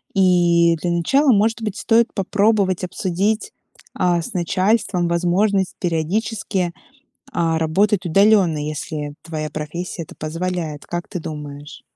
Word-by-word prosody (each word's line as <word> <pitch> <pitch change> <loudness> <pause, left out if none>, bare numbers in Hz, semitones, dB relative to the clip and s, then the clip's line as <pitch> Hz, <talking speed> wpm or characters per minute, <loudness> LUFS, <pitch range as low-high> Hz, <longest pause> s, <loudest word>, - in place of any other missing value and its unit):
И 175 -3 +4
для 175 - -1
начала, 265 - +3
может 225 +2 +2
быть, 215 -1 -3
стоит 230 +1 +2
попробовать 200 -1 +1
обсудить, 195 - -1 0.4
а, 175 -1 +1
с - - -7
начальством 185 0 +1
возможность 185 +3 +1
периодически, 180 +2 -1 0.6
а, 165 -8 +1
работать 190 +5 +1
удалённо, 195 -2 +4
если 150 0 -4
твоя 155 -2 -4
профессия 165 +3 -5
это - - -14
позволяет, 165 -1 -4
как 175 0 -4
ты 180 - -5
думаешь? 150 -2 -8
175 Hz, 120 wpm, -20 LUFS, 165-200 Hz, 0.6 s, И